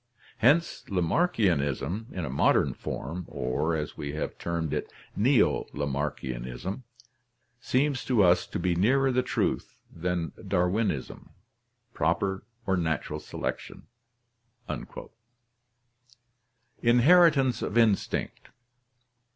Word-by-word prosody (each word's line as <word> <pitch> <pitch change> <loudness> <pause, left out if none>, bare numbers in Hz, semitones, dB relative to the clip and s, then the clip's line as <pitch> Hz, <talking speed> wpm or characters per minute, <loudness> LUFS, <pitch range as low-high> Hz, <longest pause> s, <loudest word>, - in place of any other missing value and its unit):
Hence 145 +9 +3
Lamarckianism 90 - 0
in 90 -3 -4
a - - -5
modern 70 - +3
form, 85 +6 -5
or, 65 +6 -1
as 75 -1 -4
we 70 -1 -5
have 75 - -3
termed 85 -3 -2
it, - - -3 0.2
Neo 125 +5 +3
Lamarckianism, 70 - -3 0.8
seems 135 +2 0
to 120 -6 +3
us 90 -1 +4
to - - -4
be 90 0 +1
nearer 130 +10 +3
the 125 0 +2
truth - - -2 0.2
than 85 -2 -2 0.2
Darwinism 90 - -1 0.6
proper 95 -1 0 0.2
or 95 - +2
natural 80 -2 -2
selection." - - -5 3.0
Inheritance 135 +2 +5
of 105 - -2
Instinct. 110 -4 +1
90 Hz, 95 wpm, -28 LUFS, 80-120 Hz, 3.0 s, Inheritance